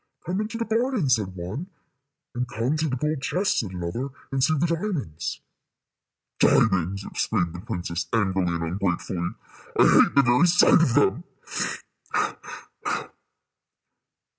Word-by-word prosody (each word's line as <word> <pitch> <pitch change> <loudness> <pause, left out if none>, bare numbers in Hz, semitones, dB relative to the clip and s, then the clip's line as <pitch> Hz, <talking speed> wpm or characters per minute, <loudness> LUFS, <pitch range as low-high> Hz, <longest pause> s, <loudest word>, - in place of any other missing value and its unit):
"Come 185 +4 -1
into 220 +2 -4
the 230 - -2
garden," 225 - +1
said 105 -6 +1
one; 95 - -5 0.7
and 125 +1 -2
"Come 120 +6 -1
to 155 0 0
the 130 - -1
gold 150 +2 -1
chests," 190 +8 +1
said 105 - -2
another, 90 +9 -4 0.2
"and 135 -1 0
see 155 +3 +3
the 155 - +2
diamonds." 165 - -3 1.0
"Diamonds!" 95 -1 +3
exclaimed 90 -6 -1
the 90 - -7
princess, 85 -3 -4
angrily 95 -5 +1
and 85 - -2
ungratefully: 90 0 -2 0.4
"I - - +7
hate - - +5
the 140 - +6
very 125 +8 +5
sight 175 -1 +6
of 125 -7 +2
them. 120 - +3
120 Hz, 135 wpm, -25 LUFS, -, 1.0 s, I